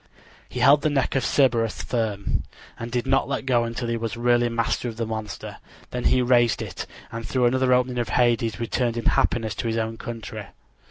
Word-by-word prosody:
He -, -, -4 dB
held 145 Hz, +1 st, +6 dB
the 155 Hz, -, +1 dB
neck 135 Hz, -4 st, 0 dB
of 135 Hz, -, +1 dB
Cerberus 115 Hz, -5 st, +2 dB
firm, 110 Hz, -4 st, -1 dB, 0.4 s
and 115 Hz, +1 st, -6 dB
did 125 Hz, 0 st, -1 dB
not 135 Hz, +1 st, +2 dB
let 140 Hz, -1 st, -2 dB
go 120 Hz, -3 st, +2 dB
until 115 Hz, +1 st, -4 dB
he 115 Hz, 0 st, -1 dB
was 115 Hz, -1 st, -4 dB
really 120 Hz, 0 st, +3 dB
master 115 Hz, +1 st, -1 dB
of 110 Hz, -, -9 dB
the 115 Hz, -, -1 dB
monster. 110 Hz, -1 st, -6 dB, 0.3 s
Then 125 Hz, -1 st, -3 dB
he 125 Hz, -, +4 dB
raised 120 Hz, -2 st, +3 dB
it, -, -, -6 dB, 0.2 s
and 115 Hz, 0 st, -5 dB
through 125 Hz, +2 st, +1 dB
another 130 Hz, +1 st, +2 dB
opening 125 Hz, 0 st, +2 dB
of 120 Hz, -, -2 dB
Hades 120 Hz, -2 st, +1 dB
returned 120 Hz, 0 st, -1 dB
in 120 Hz, -, -4 dB
happiness 110 Hz, -3 st, +1 dB
to -, -, -4 dB
his 115 Hz, 0 st, -1 dB
own 115 Hz, 0 st, -2 dB
country. 115 Hz, -2 st, -7 dB
120 Hz, 205 wpm, -24 LUFS, 115-125 Hz, 0.4 s, held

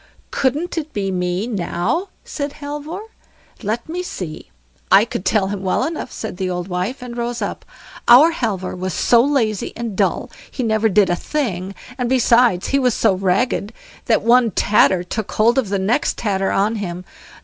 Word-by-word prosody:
"Couldn't 300 Hz, +6 st, 0 dB
it 310 Hz, -1 st, -8 dB
be 195 Hz, -2 st, -1 dB
me, 180 Hz, +2 st, -1 dB
now?" 215 Hz, -, -1 dB, 0.2 s
said 285 Hz, -1 st, -4 dB
Halvor. 295 Hz, +5 st, -6 dB, 0.6 s
"Let 225 Hz, +2 st, -3 dB
me 345 Hz, +3 st, -3 dB
see; 180 Hz, -, -7 dB, 0.4 s
I 200 Hz, +3 st, +7 dB
could 205 Hz, -, -5 dB
tell 200 Hz, -3 st, +1 dB
him 200 Hz, -1 st, -4 dB
well 190 Hz, +5 st, 0 dB
enough", 310 Hz, -2 st, -4 dB
said 220 Hz, -5 st, -6 dB
the 185 Hz, -1 st, -2 dB
old 180 Hz, 0 st, -3 dB
wife, 185 Hz, +8 st, -3 dB
and 240 Hz, -1 st, -7 dB
rose 240 Hz, 0 st, -3 dB
up. -, -, -4 dB, 0.4 s
"Our 270 Hz, +8 st, +8 dB
Halvor 210 Hz, -, -2 dB
was 185 Hz, -1 st, -4 dB
so 235 Hz, -1 st, +4 dB
lazy 235 Hz, -8 st, 0 dB
and 230 Hz, -3 st, -4 dB
dull, -, -, 0 dB, 0.2 s
he 255 Hz, -, -4 dB
never 220 Hz, -1 st, +2 dB
did 195 Hz, -2 st, +3 dB
a -, -, +2 dB
thing; 195 Hz, -, -3 dB, 0.2 s
and 245 Hz, -1 st, 0 dB
besides, 240 Hz, -6 st, +3 dB
he 275 Hz, -, +2 dB
was 250 Hz, -4 st, +2 dB
so -, -, +3 dB
ragged, 195 Hz, +3 st, 0 dB, 0.3 s
that 225 Hz, -, +2 dB
one 235 Hz, +1 st, +5 dB
tatter 190 Hz, -2 st, +3 dB
took 215 Hz, +3 st, -4 dB
hold 235 Hz, +4 st, +3 dB
of 230 Hz, -7 st, -2 dB
the 200 Hz, -, 0 dB
next 210 Hz, +9 st, 0 dB
tatter 195 Hz, -3 st, 0 dB
on 210 Hz, +3 st, +1 dB
him. 180 Hz, -3 st, -5 dB
220 Hz, 180 wpm, -20 LUFS, 190-255 Hz, 0.6 s, Our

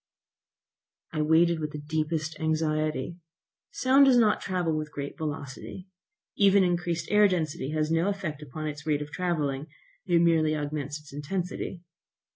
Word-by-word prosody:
I 155 Hz, -, 0 dB
waited 165 Hz, +2 st, +4 dB
with 150 Hz, 0 st, -4 dB
the -, -, -4 dB
deepest 155 Hz, +1 st, -2 dB
anxiety. 155 Hz, -1 st, -1 dB, 0.5 s
Sound 270 Hz, +2 st, +4 dB
does 260 Hz, -2 st, +6 dB
not 220 Hz, -3 st, +4 dB
travel 180 Hz, -4 st, -1 dB
with 155 Hz, 0 st, -3 dB
great 140 Hz, -1 st, -5 dB
velocity. 155 Hz, +4 st, -6 dB, 0.5 s
Even 200 Hz, -1 st, +5 dB
increased 175 Hz, -1 st, -1 dB
density 175 Hz, -8 st, +2 dB
air 155 Hz, -, -2 dB
has 155 Hz, +1 st, 0 dB
no 165 Hz, +3 st, +2 dB
effect 180 Hz, -7 st, -4 dB
upon 150 Hz, +2 st, -6 dB
its 145 Hz, 0 st, -6 dB
rate 150 Hz, -1 st, +1 dB
of 150 Hz, -, -12 dB
travelling; 150 Hz, -6 st, -1 dB, 0.4 s
it 175 Hz, -2 st, +4 dB
merely 160 Hz, -2 st, +3 dB
augments 145 Hz, 0 st, -3 dB
its 150 Hz, -1 st, -15 dB
intensity. 175 Hz, +3 st, -4 dB
155 Hz, 145 wpm, -27 LUFS, 150-175 Hz, 0.5 s, does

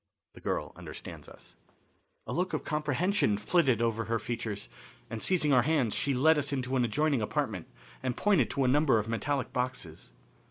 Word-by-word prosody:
The -, -, -14 dB
Girl -, -, -2 dB
Understands -, -, -9 dB
Us. -, -, -16 dB, 0.7 s
A -, -, -4 dB
look 180 Hz, +2 st, -1 dB
of -, -, -1 dB
comprehension 150 Hz, -, +1 dB
flitted 125 Hz, +1 st, +2 dB
over 115 Hz, -1 st, 0 dB
her 115 Hz, +2 st, 0 dB
features, 110 Hz, -2 st, -4 dB, 0.4 s
and, 115 Hz, -1 st, -4 dB
seizing 160 Hz, -6 st, +3 dB
our 125 Hz, -, +6 dB
hands, 135 Hz, -5 st, +1 dB
she 140 Hz, -2 st, 0 dB
led 155 Hz, +4 st, +5 dB
us 140 Hz, 0 st, -2 dB
into 130 Hz, -1 st, -1 dB
an 125 Hz, -, +3 dB
adjoining 140 Hz, +3 st, +1 dB
apartment 105 Hz, -, -2 dB, 0.3 s
and 125 Hz, -1 st, -2 dB
pointed 195 Hz, -, +3 dB
to 140 Hz, -, 0 dB
a -, -, +3 dB
number 140 Hz, -1 st, +4 dB
of 105 Hz, 0 st, -1 dB
metallic 130 Hz, +5 st, -2 dB
boxes. 110 Hz, -, -4 dB
130 Hz, 175 wpm, -30 LUFS, 115-150 Hz, 0.7 s, our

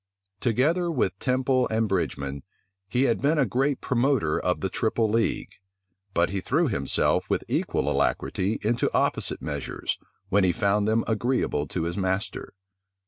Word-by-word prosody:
Together 150 Hz, -, +1 dB
with 100 Hz, -, 0 dB
Temple 130 Hz, 0 st, +1 dB
and 110 Hz, 0 st, +1 dB
Bridgeman, 70 Hz, -7 st, -2 dB, 0.5 s
he 125 Hz, +1 st, +2 dB
had 120 Hz, -4 st, +1 dB
been 150 Hz, +3 st, +2 dB
a 140 Hz, -, +4 dB
great 130 Hz, +5 st, 0 dB
promoter 125 Hz, -, +1 dB
of 90 Hz, -, -1 dB
the 95 Hz, -, 0 dB
triple 110 Hz, +3 st, 0 dB
league; 115 Hz, +1 st, 0 dB, 0.6 s
but 85 Hz, +1 st, +2 dB
he 100 Hz, -1 st, -2 dB
threw 155 Hz, -, +1 dB
himself 105 Hz, -, 0 dB
with -, -, 0 dB
equal -, -, 0 dB
alacrity 100 Hz, +4 st, 0 dB
into 115 Hz, +3 st, +1 dB
opposite -, -, 0 dB
measures, 70 Hz, -2 st, -3 dB, 0.3 s
when 100 Hz, 0 st, +3 dB
he 90 Hz, -, +4 dB
found 100 Hz, +3 st, +1 dB
them 110 Hz, +1 st, +2 dB
agreeable 110 Hz, -, 0 dB
to 85 Hz, +3 st, -3 dB
his 85 Hz, +2 st, -3 dB
master. 95 Hz, +2 st, -2 dB
110 Hz, 150 wpm, -26 LUFS, 95-130 Hz, 0.6 s, a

